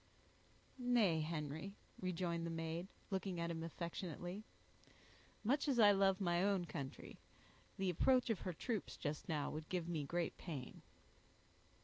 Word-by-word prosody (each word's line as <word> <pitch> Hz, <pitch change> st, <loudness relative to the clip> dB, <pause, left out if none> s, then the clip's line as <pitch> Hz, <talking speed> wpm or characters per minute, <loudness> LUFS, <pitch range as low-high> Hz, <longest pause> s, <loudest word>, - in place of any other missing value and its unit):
"Nay, 235 Hz, -9 st, +4 dB
Henry," 155 Hz, +4 st, -3 dB, 0.2 s
rejoined 175 Hz, -2 st, -1 dB
the 170 Hz, -, -1 dB
maid, 165 Hz, +2 st, -2 dB, 0.2 s
looking 190 Hz, -2 st, -1 dB
at 170 Hz, 0 st, 0 dB
him 165 Hz, -1 st, -3 dB
affectionately, 175 Hz, +3 st, -4 dB, 1.0 s
"much 275 Hz, +7 st, +2 dB
as 270 Hz, -4 st, +3 dB
I 210 Hz, -3 st, +9 dB
love 195 Hz, -1 st, +4 dB
my 175 Hz, -3 st, +2 dB
own 195 Hz, -3 st, +3 dB
country, 140 Hz, -5 st, -6 dB, 0.6 s
the 190 Hz, -1 st, +2 dB
approach 250 Hz, +7 st, +4 dB
of 220 Hz, -, 0 dB
her 185 Hz, -, -3 dB
troops 220 Hz, +4 st, -2 dB
just 150 Hz, -1 st, -3 dB
now 150 Hz, -3 st, 0 dB
would 155 Hz, 0 st, -5 dB
give 175 Hz, -2 st, -1 dB
me 165 Hz, -4 st, -1 dB
great 170 Hz, +4 st, -1 dB
pain." 140 Hz, -8 st, -5 dB
175 Hz, 140 wpm, -40 LUFS, 165-195 Hz, 1.0 s, I